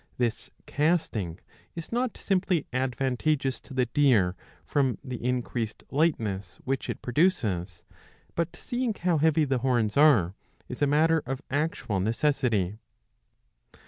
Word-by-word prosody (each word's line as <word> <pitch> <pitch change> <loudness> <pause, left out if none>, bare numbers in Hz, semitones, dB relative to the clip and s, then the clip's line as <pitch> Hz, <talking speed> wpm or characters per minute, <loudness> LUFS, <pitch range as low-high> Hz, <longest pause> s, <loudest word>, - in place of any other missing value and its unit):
^^ - - -34
This 120 -2 -1 0.2
casting 145 - 0 0.4
is 165 -1 -7
not 245 0 -1
simply 185 -5 +1
advantageous 130 +1 0
to 140 - -13
the 130 -1 +3
deer 120 -8 +3 0.3
from 135 -4 +1
the 125 -3 -6
increased 120 -2 -2
lightness 115 - 0
which 135 0 -2
it - - -5
produces, 110 - 0 0.5
but, 170 0 -2
seeing 240 -3 -2
how 175 -4 +1
heavy 155 0 +3
the 135 -2 0
horns 120 -5 +1
are, 130 - +5 0.3
is - - -7
a 145 - +4
matter 160 +3 +3
of 135 +1 -4
actual 145 -8 -1
necessity. 110 -3 +1
135 Hz, 130 wpm, -27 LUFS, 115-155 Hz, 0.5 s, are